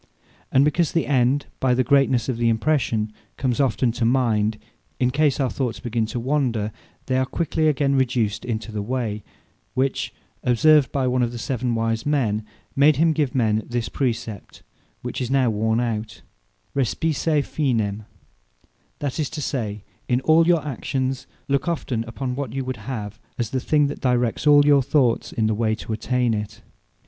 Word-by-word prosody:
And 135 +2 +5
because 155 +2 +1
the 165 - +1
End, 135 +1 +2
by 130 -2 +2
the 130 - +2
greatnesse 135 -2 +3
of 130 -3 -1
the 120 0 +2
impression, 115 -3 0 0.2
comes 130 -2 -1
often 130 -2 +2
to 120 - -3
mind, 115 -3 +2 0.4
in 125 0 +2
case 145 +1 +2
our 135 - +2
thoughts 125 -4 -2
begin 115 -3 -1
to 120 - -4
wander, 120 -5 0 0.3
they 130 0 +1
are 130 - +2
quickly 160 0 0
again 140 -2 +2
reduced 120 -6 +1
into 115 -2 -4
the 105 -1 -3
way: 110 -2 -2 0.5
which 135 +1 0 0.3
observed 140 +4 +4
by 135 -2 0
one 125 0 +1
of 120 -1 +1
the 120 - -6
seven 125 0 -2
wise 115 0 0
men, 120 -8 0 0.3
made 145 +2 +5
him 160 +3 +3
give 145 -5 -1
men 110 -3 +2
this 120 -1 -2
praecept, 115 -6 -4 0.4
which - - -4
is 125 - -2
now 130 -3 +3
worne 110 +2 +1
out, 110 -2 -3 0.5
Respice 150 +3 +1
Finem; 110 -8 -1 0.9
that 145 0 -3
is 150 - 0
to 160 - -6
say, 110 -8 -3 0.2
in 125 0 +2
all 160 +4 +4
your 170 -4 +3
actions, 130 -1 -3 0.2
look 140 +4 0
often 130 -9 -1
upon 125 +2 -4
what 135 -4 -4
you 135 -1 -3
would 130 0 -4
have, 105 -4 -5 0.2
as 120 -3 -2
the 130 - 0
thing 150 +3 +2
that 140 - -4
directs 125 +1 +1
all 145 -1 +7
your 145 -1 +5
thoughts 130 -3 +1
in 110 - 0
the 110 - +2
way 110 0 +1
to 110 - -6
attain 120 +1 0
it. 105 0 -5
125 Hz, 175 wpm, -23 LUFS, 115-140 Hz, 0.9 s, all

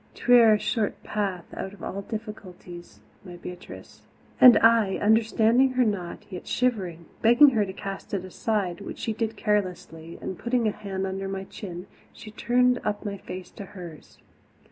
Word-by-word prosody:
'Twere 235 -3 +6
a - - +1
short 215 -1 -2
path 195 -4 -3
out 190 - -6
of 205 - -14
all 200 - -4
difficulties, 195 -5 -9 0.2
my 180 -3 -10
Beatrice." 180 +1 -11 0.4
And 250 -2 +9
I, 225 -4 +4
understanding 225 +4 +3
her 255 -1 +3
not, 190 -5 -3
yet 180 - -8
shivering, 190 -10 -1 0.2
begged 240 +5 +7
her 215 -5 +1
to - - -5
cast 195 0 -7
it 185 -1 -4
aside, 185 -2 -2
which - - -7
she 225 - -3
did 225 0 -3
carelessly 180 -6 -2
and, 185 - -6
putting 235 -1 0
a - - +1
hand 195 -2 -5
under 195 0 -4
my 195 0 -4
chin, 180 -2 -8 0.3
she 215 - -11
turned 250 +3 +2
up 210 +1 -3
my 200 -1 -4
face 185 -1 -9
to 200 - -9
hers. 170 -4 -11
205 Hz, 165 wpm, -26 LUFS, 185-225 Hz, 0.4 s, And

